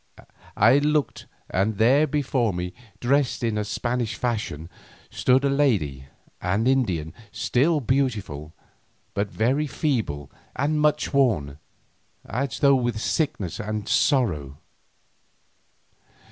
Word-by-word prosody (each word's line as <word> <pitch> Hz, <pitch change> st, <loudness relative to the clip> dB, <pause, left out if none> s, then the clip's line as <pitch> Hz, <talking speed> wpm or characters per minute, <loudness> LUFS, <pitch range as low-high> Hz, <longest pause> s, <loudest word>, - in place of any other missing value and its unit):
I 140 Hz, -, +6 dB
looked 150 Hz, 0 st, 0 dB, 0.2 s
and 100 Hz, +3 st, 0 dB
there 135 Hz, +8 st, +4 dB
before 130 Hz, -6 st, 0 dB
me, 90 Hz, 0 st, -4 dB, 0.3 s
dressed 135 Hz, 0 st, +1 dB
in 115 Hz, -2 st, +1 dB
the 105 Hz, 0 st, -1 dB
Spanish 120 Hz, +2 st, -2 dB
fashion, 105 Hz, -10 st, -3 dB, 0.4 s
stood 130 Hz, +2 st, +2 dB
a -, -, +4 dB
lady, 95 Hz, -, +1 dB, 0.3 s
an 95 Hz, +5 st, 0 dB
Indian, 95 Hz, -, +1 dB, 0.2 s
still 150 Hz, +6 st, +1 dB
beautiful, 110 Hz, -, -1 dB, 0.6 s
but 100 Hz, 0 st, -1 dB
very 130 Hz, +9 st, 0 dB
feeble 110 Hz, -, -2 dB, 0.2 s
and 150 Hz, +2 st, 0 dB
much 150 Hz, 0 st, +1 dB
worn, 90 Hz, -, +1 dB, 0.7 s
as 125 Hz, +3 st, -3 dB
though 140 Hz, -1 st, +6 dB
with 120 Hz, -4 st, 0 dB
sickness 110 Hz, -, -1 dB
and 105 Hz, -1 st, -4 dB
sorrow. 75 Hz, -, +1 dB
120 Hz, 110 wpm, -24 LUFS, 95-140 Hz, 0.7 s, I